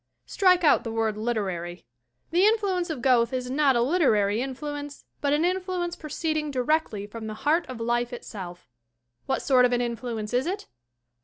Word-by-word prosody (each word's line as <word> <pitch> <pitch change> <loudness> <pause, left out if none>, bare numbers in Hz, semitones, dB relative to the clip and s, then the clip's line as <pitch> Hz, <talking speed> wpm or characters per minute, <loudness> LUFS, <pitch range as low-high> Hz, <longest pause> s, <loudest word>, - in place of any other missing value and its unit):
Strike 365 -3 +3
out 300 - +5
the 230 - -4
word 225 -1 0
"literary." 190 -6 -3 0.5
The 350 +3 +3
influence 395 -5 +1
of 280 -7 -4
Goethe 245 -2 +3
is 250 -1 -3
not 275 -1 +3
a 235 - +3
literary 225 - +2
influence, 290 +2 -6 0.2
but 285 - +1
an 300 +3 +2
influence 365 -1 -1
proceeding 310 0 -2
directly 255 -5 0
from 220 +1 -8
the 215 - -5
heart 325 +4 +3
of 255 -2 -7
life 240 +1 0
itself. 185 -7 -8 0.6
What 265 - -1
sort 255 -2 +4
of 250 0 +3
an 245 - +2
influence 235 -2 -4
is 255 +5 +1
it? 385 +3 -3
255 Hz, 170 wpm, -26 LUFS, 230-315 Hz, 0.6 s, out